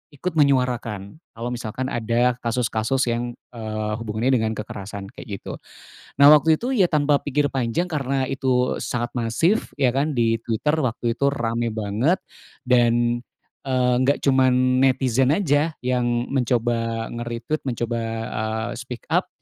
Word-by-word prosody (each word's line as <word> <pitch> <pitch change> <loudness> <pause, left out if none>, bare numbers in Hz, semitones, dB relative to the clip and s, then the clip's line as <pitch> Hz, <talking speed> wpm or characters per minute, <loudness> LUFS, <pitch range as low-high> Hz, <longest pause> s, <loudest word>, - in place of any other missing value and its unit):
ikut 180 +6 -3
menyuarakan. 125 -6 +1 0.2
Kalau 115 +2 -4
misalkan 125 +2 -4
ada 120 +2 +1
kasus-kasus 115 +2 0
yang, 120 +1 -3 0.2
eee, 110 -2 -4
hubungannya 115 +3 -1
dengan 110 0 0
kekerasan 100 -1 -7
kayak 100 -5 -8
gitu. - - -7 0.6
Nah, 140 - +8
waktu 155 +1 +4
itu, 260 +2 -2
ya, 190 -7 +3
tanpa 145 -2 +2
pikir 145 +1 +1
panjang, 130 +7 0
karena 135 -5 -1
itu 130 -2 0
sangat 120 0 -3
masif 125 - +1
ya 125 -3 +2
kan 140 +3 +1
di 115 -4 +1
Twitter 120 +7 0
waktu 120 -1 -1
itu, 140 +3 +2
rame 115 -3 -1
banget 110 - 0 0.5
dan, 120 -1 +3 0.4
eee, 125 -2 +1
nggak 140 +2 +2
cuman 130 -1 +3
netizen 130 -1 +3
aja 155 -2 +1
yang 120 -1 0
mencoba 115 -3 0
nge-retweet, 120 +5 -4
mencoba, 120 -1 -2 0.3
eee, 110 +1 -2
speak 125 -1 -8
up, - - +2
125 Hz, 140 wpm, -23 LUFS, 115-135 Hz, 0.6 s, Nah